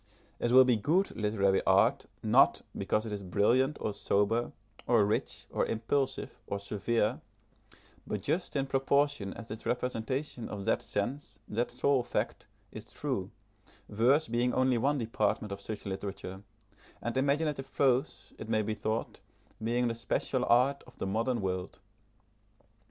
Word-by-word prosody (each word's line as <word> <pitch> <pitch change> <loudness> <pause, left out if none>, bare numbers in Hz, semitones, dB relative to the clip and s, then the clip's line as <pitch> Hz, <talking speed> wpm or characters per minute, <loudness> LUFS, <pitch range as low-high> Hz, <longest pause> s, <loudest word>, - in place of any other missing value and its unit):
It 120 - 0
will 130 +1 +9
be 125 -3 +3
good 170 - +1
literary 100 -3 +2
art 95 +1 +3 0.2
not - - +4
because 110 +1 0
it 110 - -5
is 100 - -4
brilliant 120 - +2
or 105 - -2
sober, 105 +5 +1 0.4
or 115 -4 +5
rich, 105 - -2
or - - +1
impulsive, 130 +5 -1
or 100 - -2
severe, 105 +2 -1 0.9
but - - -3
just 175 -1 -1
in 135 -1 +1
proportion 135 -5 +1
as 115 -1 -9
its 110 - -6
representation 125 +1 -2
of 100 -2 -5
that - - +2
sense, 110 +1 -4
that 115 +3 -1
soul 130 +2 +2
fact, - - -3 0.2
is - - -8
true, - - -3 0.6
verse 125 +9 +3
being 120 +2 +1
only 130 -2 +3
one 140 +5 +2
department 110 -3 -1
of 100 0 -5
such 105 0 -6
literature, 95 -1 -5 0.6
and 120 0 -4
imaginative 140 0 0
prose, 135 +1 +1
it 110 - -7
may 110 -1 +2
be 110 - -1
thought, 110 +1 -3 0.4
being 120 +2 +1
the 115 - 0
special 120 +2 -1
art 130 +4 +3
of - - -17
the - - -3
modern 115 +4 0
world. 95 -1 -3
115 Hz, 150 wpm, -31 LUFS, 105-130 Hz, 0.9 s, will